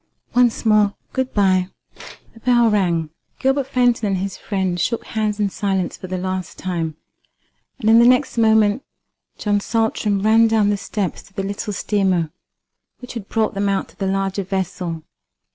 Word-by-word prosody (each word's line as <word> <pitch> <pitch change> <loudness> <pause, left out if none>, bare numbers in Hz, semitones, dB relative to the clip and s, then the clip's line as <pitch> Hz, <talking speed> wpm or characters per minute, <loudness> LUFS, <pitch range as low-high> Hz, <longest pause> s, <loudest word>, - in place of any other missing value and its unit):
Once 245 -2 +2
more, 210 -2 +4 0.2
good 260 -1 -1
bye." 185 -3 +2 0.7
The 225 - -16
bell 240 -1 +3
rang. 170 -6 +1 0.3
Gilbert 270 0 +1
Fenton 245 -4 +2
and 195 -1 0
his 190 0 -3
friend 190 -3 -2
shook 230 +7 -1
hands 215 -1 -2
in 205 -2 +1
silence 190 -3 -1
for 185 - -9
the 185 0 -3
last 185 0 -4
time, 165 -4 -3 0.8
and 230 -5 -3
in 225 +1 +7
the 235 - +6
next 255 +2 +3
moment 220 +1 +3 0.5
John 205 -1 +1
Saltram 215 -2 0
ran 225 +1 +5
down 215 -2 +3
the 205 - 0
steps 195 -1 -3
to 200 - -21
the 195 - -2
little 200 +1 -4
steamer 190 -6 0 0.7
which 250 - -10
had 225 -5 -7
brought 220 -1 0
them 200 0 0
out 195 -1 -1
to - - -20
the 195 - -2
larger 195 0 -1
vessel. 180 -3 -3
205 Hz, 170 wpm, -20 LUFS, 190-225 Hz, 0.8 s, in